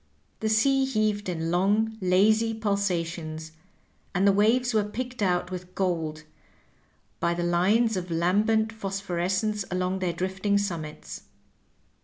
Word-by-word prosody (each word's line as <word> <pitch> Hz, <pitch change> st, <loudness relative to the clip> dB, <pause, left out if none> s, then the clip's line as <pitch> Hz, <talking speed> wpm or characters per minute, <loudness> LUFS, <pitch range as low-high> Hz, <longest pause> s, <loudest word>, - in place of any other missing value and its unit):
The 220 Hz, -, -1 dB
sea 270 Hz, +5 st, +3 dB
heaved 215 Hz, -5 st, 0 dB
in 165 Hz, -1 st, -2 dB
long, 205 Hz, +5 st, +2 dB
lazy 215 Hz, +5 st, +3 dB
pulsations, 170 Hz, -7 st, -2 dB, 0.6 s
and 185 Hz, +2 st, +2 dB
the 200 Hz, -, +6 dB
waves 230 Hz, +5 st, +2 dB
were 215 Hz, -1 st, +3 dB
picked 245 Hz, +3 st, -5 dB
out 180 Hz, -2 st, +1 dB
with 180 Hz, 0 st, -7 dB
gold 165 Hz, -5 st, -1 dB, 1.0 s
by 170 Hz, 0 st, +1 dB
the 175 Hz, -, -2 dB
lines 200 Hz, +7 st, +2 dB
of 180 Hz, -1 st, -4 dB
lambent 210 Hz, +7 st, +2 dB
phosphorescence 195 Hz, 0 st, -2 dB
along 185 Hz, +1 st, -1 dB
their 185 Hz, -2 st, 0 dB
drifting 190 Hz, +4 st, 0 dB
summits. 170 Hz, -7 st, -4 dB
195 Hz, 125 wpm, -26 LUFS, 175-215 Hz, 1.0 s, the